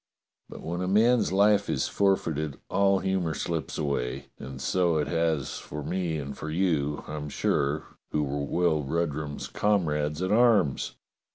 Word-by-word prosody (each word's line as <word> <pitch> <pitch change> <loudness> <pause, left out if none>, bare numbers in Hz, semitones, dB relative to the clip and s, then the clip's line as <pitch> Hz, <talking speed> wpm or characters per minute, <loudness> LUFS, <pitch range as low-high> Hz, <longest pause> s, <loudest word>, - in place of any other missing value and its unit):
But - - -10
when 85 +2 -3
a 90 - -1
man's 115 +4 +4
life 100 +1 +4
is - - 0
forfeited 80 -7 0
all 100 -1 +4
humour 95 -4 0
slips 85 -2 -3
away, 70 -2 -2
and 65 0 -8
so 85 +5 +1
it 75 - +1
has 80 -4 0
for 75 0 -7
me 85 0 -1
and 70 -1 -5
for 80 - -6
you, 80 -4 0
I'm 75 -1 -5
sure, 70 +2 0 0.3
who 75 - 0
were 70 0 -2
Will 85 0 +1
Rudrum's 75 0 -2
comrades 75 -6 0
at 95 - -1
arms. 110 - +3
80 Hz, 155 wpm, -27 LUFS, 75-95 Hz, 0.3 s, man's